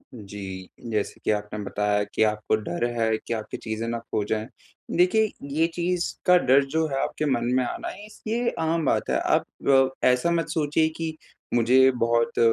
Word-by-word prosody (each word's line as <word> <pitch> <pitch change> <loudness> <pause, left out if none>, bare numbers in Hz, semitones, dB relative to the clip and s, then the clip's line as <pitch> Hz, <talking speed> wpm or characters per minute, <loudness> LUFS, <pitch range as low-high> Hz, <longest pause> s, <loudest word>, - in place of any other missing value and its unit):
जी। 100 -3 -8 0.2
जैसे 105 -2 -2
कि - - +2
आपने 105 0 -3
बताया 105 0 0
कि 105 +2 0
आपको 105 0 +1
डर 105 0 -2
है 110 -1 +2
कि 115 - -5
आपकी 110 -2 -5
चीज़ें 110 +1 -4
ना 115 0 -2
खो 105 - 0
जाएँ। 110 +1 -2 0.5
देखिए 210 +5 +3 0.2
ये 165 +1 +3
चीज़ 175 0 -1
का 180 -1 +7
डर 140 -4 +4
जो 160 0 +3
है 135 -2 -1
आपके 155 - -2
मन 120 -3 +1
में 130 - +3
आना, 120 - -4 0.2
इस 215 - -16
ये 235 +2 +1
आम 160 0 0
बात - - +1
है। - - +2
आप - - +1 0.2
अ, 135 -1 +3
ऐसा 125 +7 +3
मत 170 -1 0
सोचिए 155 0 +1
कि 160 -1 -3 0.4
मुझे 130 +3 +5
बहुत 115 -1 +1
125 Hz, 185 wpm, -25 LUFS, 110-160 Hz, 0.5 s, का